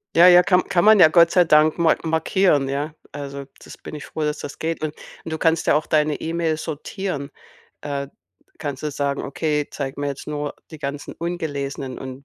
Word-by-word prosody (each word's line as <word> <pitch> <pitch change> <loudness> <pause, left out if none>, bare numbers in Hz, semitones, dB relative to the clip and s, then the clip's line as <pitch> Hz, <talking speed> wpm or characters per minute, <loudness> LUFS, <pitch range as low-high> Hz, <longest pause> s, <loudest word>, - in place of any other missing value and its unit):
Ja, 175 +2 +8
ja, 180 0 +8
kann 180 -1 +3
kann 175 -1 +2
man 215 -1 +7
ja 160 - +9
Gott 170 +1 +5
sei 180 -2 +4
Dank 155 +1 +4
mar 165 -2 +4
markieren, 160 -2 +2
ja. 145 +3 -3 0.2
Also, 140 -1 -6 0.2
das - - -12
bin - - -9
ich 150 - -8
froh, 160 - -6
dass 150 0 -1
das 140 - -8
geht, 165 -1 -3
und 155 -1 -2 0.3
und 160 - -7
du 160 - -2
kannst 165 0 +1
ja - - +5
auch 155 - +1
deine 150 -1 +1
E-Mails 165 -1 -2
sortieren. 160 -1 -5 0.5
Äh, 140 -1 -4 0.5
kannst 145 -1 -5
du 150 - -1
sagen: 140 0 -2
„Okay, 150 +1 -1
zeig 135 -2 -4
mir 145 - -2
jetzt 140 +1 -5
nur 145 -1 -3 0.2
die 155 - -10
ganzen 140 0 -5
ungelesenen“ 145 -6 -4
und 130 +1 -8
150 Hz, 205 wpm, -22 LUFS, 140-165 Hz, 0.5 s, ja